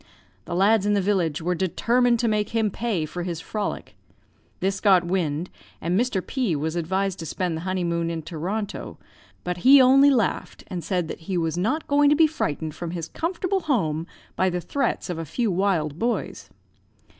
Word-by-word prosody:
The 175 - -4
lads 205 +2 +3
in 205 - +3
the - - +3
village 180 -6 0
were 180 +2 +1
determined 235 +7 +2
to 235 - +1
make 210 -2 0
him 220 -2 +2
pay 205 -8 -1
for 175 +3 -6
his 170 -2 -3
frolic. 210 +4 -4 0.6
This 195 +1 -1
got 190 -4 +5
wind, 175 -2 -1 0.3
and 170 +2 -1
Mr. 235 -7 0
P 245 - -1
was 155 +3 -2
advised 190 +3 -1
to 165 - -5
spend 180 -1 -2
the 160 - -5
honeymoon 170 -2 -1
in 165 -1 -4
Toronto; 180 +6 -4 0.5
but 180 0 -3
he 265 +9 +7
only 270 +2 +7
laughed, 240 -8 0
and 175 -2 -4
said 180 0 -1
that - - -6
'he 185 - 0
was 165 -2 0
not 220 - -1
going 285 0 +4
to 295 - +5
be 320 +1 +6
frightened 160 - -2
from 170 +2 -6
his 165 -1 -5
comfortable 365 +3 -1
home 175 - -1 0.3
by 185 - +2
the 180 0 -2
threats 270 +8 -2
of 175 -3 -4
a - - -3
few 220 - -1
wild 175 -5 0
boys.' 235 +1 -2
185 Hz, 190 wpm, -24 LUFS, 170-230 Hz, 0.6 s, he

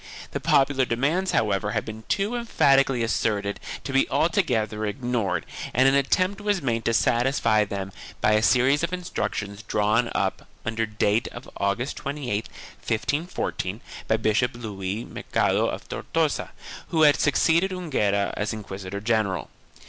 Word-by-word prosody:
1 - - -16
The - - -2
popular 135 -1 +3
demands, 145 +11 0
however, 105 -1 +1
had - - -1
been 110 0 -8
too 205 +4 0
emphatically 135 - +3
asserted 105 -3 0 0.2
to 135 - -5
be 135 - +3
altogether 120 - +1
ignored 105 -6 -1 0.3
and 130 +2 +5
an 135 - +4
attempt 185 +9 +2
was 205 -2 +1
made 115 -6 -1
to 115 - +2
satisfy 120 -4 +2
them 100 -1 -5 0.3
by 105 - +3
a 105 0 +4
series 130 +5 +4
of 170 +1 -1
instructions 105 - -3
drawn 110 +2 +1
up, - - -1 0.2
under 115 0 -1
date 105 +1 +1
of 120 - -9
August 100 +7 -1
28, 135 -7 -3 0.3
1514, 115 - -2 0.3
by 110 - +3
Bishop 110 +3 +1
Luis 105 -2 -4
Mercader - - 0
of - - -6
Tortosa, - - -1 0.4
who 160 -2 +2
had 145 -1 +6
succeeded 160 +5 +3
Enguera 130 - 0
as 105 +2 -2
inquisitor 100 -2 -6
general. 110 -4 0
115 Hz, 145 wpm, -25 LUFS, 105-140 Hz, 0.4 s, had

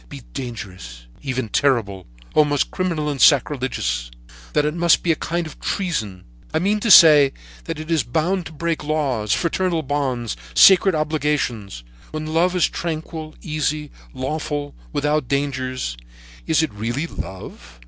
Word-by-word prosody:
—be - - -9
dangerous, 95 - -7 0.2
even 130 -3 -3
terrible, 105 -8 0 0.3
almost 145 -2 +2
criminal 170 -5 -1
and 145 -3 -2
sacrilegious; 125 - +2 0.4
that 150 - +2
it 150 - 0
must 170 -1 +3
be 170 - +2
a - - +2
kind 170 +2 -2
of 155 - -10
treason; 110 - -3 0.3
I - - +4
mean 200 +6 +1
to 230 - -1
say 150 -7 +8 0.3
that - - -5
it 155 +1 -6
is 160 -3 +3
bound 165 +9 -1
to - - -11
break 165 +1 -2
laws, 140 -9 -1
fraternal 170 - 0
bonds, 130 -5 -2 0.2
sacred 190 - +7
obligations; 150 - -2 0.3
when 155 0 -5
love 170 +4 +1
is 180 - +3
tranquil, 160 -1 -5
easy, 150 -2 -2 0.2
lawful 145 +2 -3
and - - -24
without 150 -1 0
dangers, 130 - -2 0.5
is 160 0 +3
it 160 - -3
really 120 +8 -3
love?' 90 - -9
150 Hz, 150 wpm, -21 LUFS, 125-160 Hz, 0.5 s, say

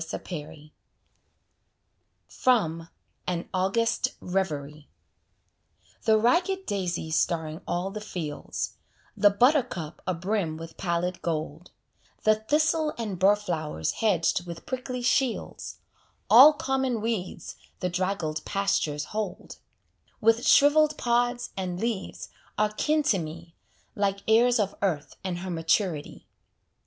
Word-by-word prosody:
Shakespeare 150 -2 -7 1.6
From 165 -10 +1 0.4
"AN 175 -1 -2
AUGUST 195 +5 0
REVERIE" 150 -6 -3 1.2
The 220 -1 +5
ragged 360 - +2
daisy 175 -5 -2
starring 160 0 0
all 180 +3 -2
the 215 +1 -6
fields, 165 -8 -5 0.4
The 205 -1 +5
buttercup 200 - +1
abrim 185 -2 -1
with 165 0 -9
pallid 175 0 -2
gold, 160 +1 -4 0.5
The 215 - +6
thistle 300 +7 +1
and 210 -6 -4
burr 195 +2 +6
flowers 155 - -3
hedged 180 -4 +1
with 170 -1 -8
prickly 255 -1 -4
shields, 250 0 -1 0.5
All 305 - +10
common 265 -4 -1
weeds 210 -7 -4 0.2
the 180 - -1
draggled 180 -4 -2
pastures 180 -7 0
hold, 210 -4 -4 0.6
With 225 +2 +3
shrivelled 300 +1 +5
pods 245 0 0
and 180 -2 -3
leaves, 225 -3 -3 0.3
are 210 0 +2
kin 305 +8 +1
to 215 -9 +2
me, 165 +1 -8 0.4
Like 200 -1 -1
heirs 235 +2 +4
of 200 -2 0
earth 155 -8 -1
and 185 -2 -3
her 185 0 -5
maturity. 165 -1 -1
195 Hz, 110 wpm, -27 LUFS, 165-230 Hz, 1.6 s, All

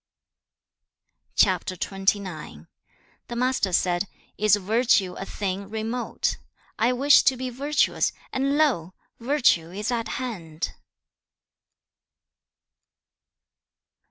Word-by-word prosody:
CHAP. 185 -4 +4
XXIX. 185 - -2 0.6
The 240 - -6
Master 250 -5 +1
said, 175 +2 +1 0.3
'Is 215 0 +4
virtue 205 -2 +2
a 195 - -6
thing 195 0 -4
remote? 225 +3 -2 0.4
I 230 +3 +3
wish 275 +3 +6
to 265 - +3
be 255 0 -4
virtuous, 285 +5 +1 0.2
and 275 +2 +1
lo! 215 - +1 0.2
virtue 240 - +2
is 205 +6 -3
at 230 -2 -1
hand.' 175 -11 -5
215 Hz, 90 wpm, -25 LUFS, 185-250 Hz, 0.6 s, wish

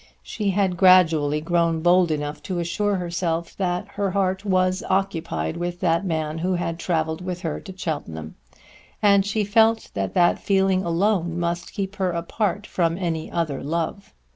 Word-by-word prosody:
She 210 -2 -2
had 190 -2 +1
gradually 165 -6 +5
grown 165 0 +1
bold 175 +1 +4
enough 150 -1 -3
to 185 - -1
assure 175 +5 0
herself 170 -2 -2
that 180 +1 -1
her 200 -1 -2
heart 190 0 0
was 185 -1 +1
occupied 165 - -1
with 175 0 -3
that 170 0 +2
man 160 -3 -2
who 180 +2 0
had 170 -1 -3
travelled 160 -1 -1
with 180 -1 -4
her 160 -3 -3
to 190 0 -11
Cheltenham; 80 - -5 0.7
and 200 -1 +5
she 210 +2 -1
felt 225 +2 +3
that 95 -1 -3
that 175 -1 +4
feeling 190 -1 +2
alone 175 -1 0
must 170 0 -3
keep 195 0 -4
her 190 -2 +1
apart 195 +4 -2
from 170 -4 0
any 165 -4 -2
other 155 -5 -2
love. 165 +6 -3
175 Hz, 165 wpm, -23 LUFS, 165-195 Hz, 0.7 s, gradually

